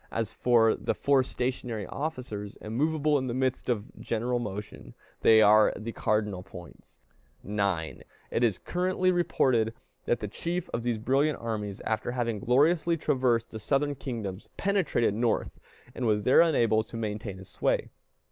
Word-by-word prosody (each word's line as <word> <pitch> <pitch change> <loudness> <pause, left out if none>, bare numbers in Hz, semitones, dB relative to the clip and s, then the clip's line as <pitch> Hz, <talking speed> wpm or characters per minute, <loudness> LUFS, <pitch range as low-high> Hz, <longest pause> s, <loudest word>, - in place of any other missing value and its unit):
As 115 -1 -3
for 115 -2 +4
the - - -2
four 140 -1 +3
stationary 125 -4 -3
officers, 125 - -5
immovable 150 +6 +1
in 130 - -3
the 120 - -2
midst 130 0 -1
of 110 -3 -1
general 120 +2 -1
motion, 105 - -7 0.3
they 110 -1 +7
are 105 +1 +6
the 115 +2 -5
cardinal 105 -4 -1
points. 90 -1 -13 0.5
9. 100 -5 -2 0.3
It 120 - 0
is 110 -6 +2
currently 185 +1 0
reported 125 -10 +1 0.3
that 120 - +1
the 105 - -4
chief 170 - -4
of 115 - -2
these 120 -1 -1
brilliant 135 +7 +1
armies, 105 -3 -4
after 110 +2 -2
having 115 -4 -1
gloriously 155 - +3
traversed 125 -6 +1
the 110 - -6
Southern 145 +6 0
kingdoms, 115 -8 -6
penetrated 195 - +1
North, 115 +2 -1 0.3
and 125 - -2
was 105 -1 +2
there 130 +7 +6
unable 115 -10 +3
to 115 - -9
maintain 105 -2 -4
his 95 0 -12
sway. - - -1
115 Hz, 155 wpm, -28 LUFS, 105-135 Hz, 0.5 s, they